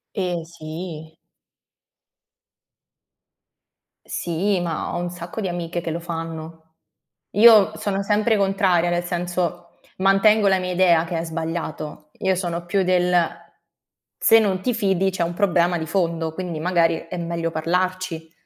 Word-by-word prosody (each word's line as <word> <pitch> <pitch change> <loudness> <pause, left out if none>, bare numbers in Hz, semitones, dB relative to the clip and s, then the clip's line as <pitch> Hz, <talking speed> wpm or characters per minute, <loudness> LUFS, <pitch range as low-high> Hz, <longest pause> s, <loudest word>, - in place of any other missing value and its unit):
Ehm, 180 -4 -2
sì. 160 -1 -8 2.9
Sì, 180 +3 -1
ma 165 -3 -3
ho - - -1
un 175 0 -3
sacco 175 +4 -7
di 190 - -2
amiche 175 0 -3
che 165 - -4
lo 165 +1 -3
fanno. 165 -1 -7 0.6
Io 215 -2 +7
sono 200 -1 -2
sempre 210 +2 +2
contraria, 190 -3 +2
nel 175 0 0
senso, 175 -1 -3 0.2
mantengo 200 +2 +4
la 190 -1 +3
mia 180 0 -3
idea 170 -2 +4
che 165 0 -3
è 165 - -2
sbagliato. 160 -2 -5
Io 190 -1 +1
sono 175 -2 -3
più 195 +1 +1
del: 180 0 +2 1.0
"Se 225 - +6
non 190 -4 0
ti 245 +3 0
fidi 195 -3 +1
c'è 180 -2 -1
un 170 +1 -2
problema 175 -3 +2
di 160 - -5
fondo, 165 -2 -1
quindi 175 -4 -4
magari 170 -1 +1
è 180 - -6
meglio 170 -1 -2
parlarci." 175 0 -2
175 Hz, 140 wpm, -22 LUFS, 165-190 Hz, 2.9 s, Io